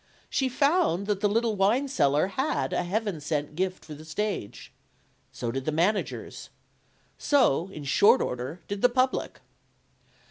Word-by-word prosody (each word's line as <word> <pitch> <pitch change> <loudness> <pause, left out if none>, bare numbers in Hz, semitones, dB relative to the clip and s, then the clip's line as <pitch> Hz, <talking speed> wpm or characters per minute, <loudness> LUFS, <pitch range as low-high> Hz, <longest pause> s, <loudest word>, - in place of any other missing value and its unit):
She 265 -1 +1
found 280 - +2
that 205 -1 -1
the 205 0 +2
little 225 +1 +1
wine 215 +8 +2
seller 150 - +2
had 265 +9 -1
a - - +1
Heaven 195 -2 -2
sent 145 0 -2
gift 185 +1 -2
for 155 - -9
the 150 +1 -11
stage. 175 - -4 0.6
So 120 - -4
did 135 +1 -4
the 155 - 0
managers. 180 +7 -1 0.7
So, 250 - +3
in 150 - -8
short 200 - +5
order, 125 +7 -4
did 200 0 -4
the 245 - +5
public. 255 +1 -1
195 Hz, 150 wpm, -27 LUFS, 155-235 Hz, 0.7 s, short